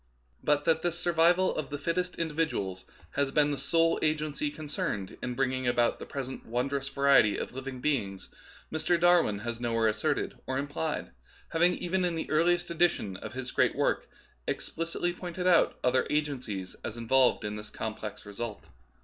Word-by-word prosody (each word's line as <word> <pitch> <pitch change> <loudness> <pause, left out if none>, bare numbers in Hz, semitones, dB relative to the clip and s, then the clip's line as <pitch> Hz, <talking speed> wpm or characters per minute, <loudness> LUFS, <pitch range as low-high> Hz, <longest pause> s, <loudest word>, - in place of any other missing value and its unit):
But 150 0 +2
that 160 0 +3
this 175 0 -1
survival 175 +1 +3
of 150 -3 -3
the 145 - -3
fittest 180 +5 -1
individuals 150 - -2 0.3
has 140 -1 +1
been 150 +1 +3
the - - 0
sole 165 +3 +2
agency 155 -1 0
concerned 145 - -4
in 125 -1 -3
bringing 130 -1 0
about 120 -1 +2
the - - -8
present 130 -1 -5
wondrous 135 +4 -2
variety 140 -7 +4
of - - -4
living 130 -1 -6
beings 110 -10 -1 0.5
Mr. 170 +2 +1
Darwin 175 -11 +4
has 120 0 -3
nowliere 115 -2 +1
asserted 110 0 -1
or 130 - -1
implied, 145 - -3 0.4
having 175 +2 +3
even 185 +1 -1
in 175 -2 0
the 160 - -4
earliest 175 +3 +2
edition 165 - +1
of - - -8
his 130 0 -5
great - - +2
work - - 0 0.4
explicitly 170 +1 -2
pointed 180 0 -5
out 180 -2 +5
certain - - -29
other 125 +1 +3
agencies 125 -11 -2
as 110 - -5
involved 125 0 +3
in 105 0 -3
the 105 0 -7
complex 110 -2 -5
result. 105 +1 -6
140 Hz, 165 wpm, -29 LUFS, 120-165 Hz, 0.5 s, out